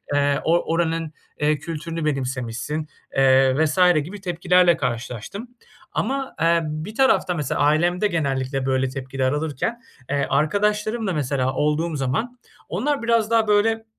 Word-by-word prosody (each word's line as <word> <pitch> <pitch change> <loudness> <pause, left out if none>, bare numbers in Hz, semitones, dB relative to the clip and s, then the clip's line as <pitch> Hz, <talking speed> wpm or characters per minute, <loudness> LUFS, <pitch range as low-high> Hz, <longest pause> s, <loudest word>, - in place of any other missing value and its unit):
eee, 145 0 +2
"O 170 +2 +3
oranın, 165 -2 -1 0.3
eee, 150 0 +2
kültürünü 165 0 -5
benimsemişsin." 135 +1 -3 0.3
eee, 135 0 +5
vs. 155 +4 -1 0.2
gibi 195 +6 -9
tepkilerle 180 -1 +3
karşılaştım. 125 - -4 0.5
Ama, 270 0 -2
eee, 170 0 +3
bir 155 +8 -5
tarafta 265 -8 +3
mesela 145 -3 -2
ailemde 175 +7 +2
genellikle 135 -5 -1
böyle 130 0 +1
tepkiler 130 0 -2
alırken, 155 - -2 0.3
eee, 140 -1 +1
arkadaşlarımla 210 +6 0
mesela 135 -3 -1
olduğum 150 +3 0
zaman, 220 - -2 0.3
onlar 285 -2 -1
biraz 230 -1 +2
daha 225 -2 +3
böyle, 225 +2 +2
160 Hz, 130 wpm, -22 LUFS, 135-205 Hz, 0.5 s, eee